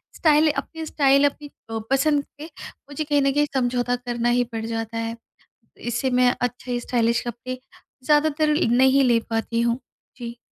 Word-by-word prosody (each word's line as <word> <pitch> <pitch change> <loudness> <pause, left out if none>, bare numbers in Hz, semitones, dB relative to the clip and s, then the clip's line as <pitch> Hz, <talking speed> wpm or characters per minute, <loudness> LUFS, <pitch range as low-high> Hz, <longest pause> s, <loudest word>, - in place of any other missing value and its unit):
Style 310 -1 +4
अपनी 320 +2 -5
style 280 -2 +3
अपनी 290 +1 -12 0.2
अ, 225 0 -3
पसंद 285 +1 +2
पे 300 - -8 0.4
मुझे 290 +2 -3
कहीं 290 -1 +1
न 275 0 +2
कहीं 295 0 +3
समझौता 245 -1 0
करना 240 -1 -2
ही 245 - +3
पड़ 225 0 -3
जाता 225 0 -4
है। 230 0 -3 0.8
इससे 260 +3 0
मैं 250 0 +3
अच्छे 245 0 -2
स्टाइलिश 235 -1 +1
कपड़े 245 +2 -5 0.5
ज़्यादातर 300 +1 +3 0.2
नहीं 265 +2 +5
ले 240 -2 +3
पाती 225 +1 -1
हूँ। 235 +2 0 0.4
जी। 235 -2 -7
250 Hz, 160 wpm, -23 LUFS, 235-290 Hz, 0.8 s, नहीं